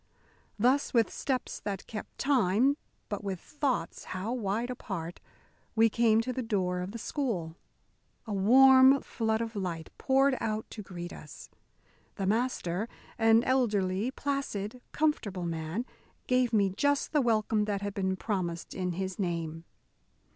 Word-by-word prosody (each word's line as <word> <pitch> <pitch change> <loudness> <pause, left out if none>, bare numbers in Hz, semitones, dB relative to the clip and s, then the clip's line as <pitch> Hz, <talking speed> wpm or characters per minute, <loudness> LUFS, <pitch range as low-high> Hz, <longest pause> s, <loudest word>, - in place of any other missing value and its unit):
Thus, 255 +5 +2
with 230 -2 +4
steps 260 -3 -2
that 200 -2 -4
kept 215 - -8
time, 260 0 +3 0.3
but 205 -1 -4
with 195 -3 -3
thoughts 280 - -2
how 190 +6 -3
wide 230 +1 -1
apart, 175 -8 -5 0.6
we 225 0 +5
came 225 -1 +4
to 255 +2 -3
the 255 - -2
door 190 -6 0
of 180 +2 -4
the 230 - -6
school. 210 - -3 0.7
A 215 - -4
warm 260 +6 +7
flood 220 -1 -1
of 230 0 -4
light 175 -5 -4
poured 270 0 +3
out 215 0 -1
to 215 - -6
greet 175 -3 -7
us. - - -11 0.6
The 195 - -2
Master, 215 -2 0 0.3
an 225 +1 +5
elderly, 210 -5 +1
placid, 255 -5 -3
comfortable 210 - 0
man, 165 +7 -3 0.4
gave 250 -1 +2
me 200 -4 +3
just 285 +8 +1
the 300 - +3
welcome 220 -3 +2
that 205 -1 -2
had 205 0 -3
been 190 -1 0
promised 180 -5 -3
in 180 -1 -2
his 190 +2 -4
name. 165 -3 -3
215 Hz, 145 wpm, -30 LUFS, 190-250 Hz, 0.7 s, warm